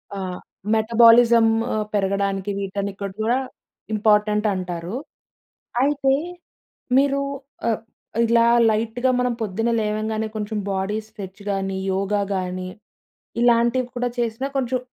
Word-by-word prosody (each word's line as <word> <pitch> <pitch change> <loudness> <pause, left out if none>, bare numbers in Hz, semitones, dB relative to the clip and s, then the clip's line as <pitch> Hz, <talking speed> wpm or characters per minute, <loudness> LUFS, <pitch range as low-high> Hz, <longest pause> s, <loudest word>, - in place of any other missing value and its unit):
ఆ! - - -4 0.5
మెటబాలిజం 230 +1 +6 0.3
ఆహ్, 215 -1 -1
పెరగడానికి 200 0 0
వీటానికి 200 0 -4 0.2
కూడా 235 +3 +2 0.6
ఇంపార్టెంటంటారు. 210 -4 +1 0.9
అయితే 275 -1 +2 0.9
మీరు 280 0 +3 0.5
ఆహ్, 225 -2 +1 0.5
ఇలా 230 0 +4 0.2
లైట్‌గా 225 +4 0
మనం 250 -1 +1
పొద్దున్న 225 +3 -1
లేవంగానే 215 +1 -1
కొంచెం 215 0 -3
బాడీ 195 +2 -1
స్ట్రెచ్ 200 -2 -10
గాని, 195 -1 -2 0.2
యోగ 195 +1 -2 0.2
గాని 185 0 -3 0.7
ఇలాంటివి 240 +1 +3
కూడా 245 0 0
చేసినా 235 +3 -1
కొంచెం 255 -1 0
215 Hz, 100 wpm, -22 LUFS, 195-235 Hz, 0.9 s, మెటబాలిజం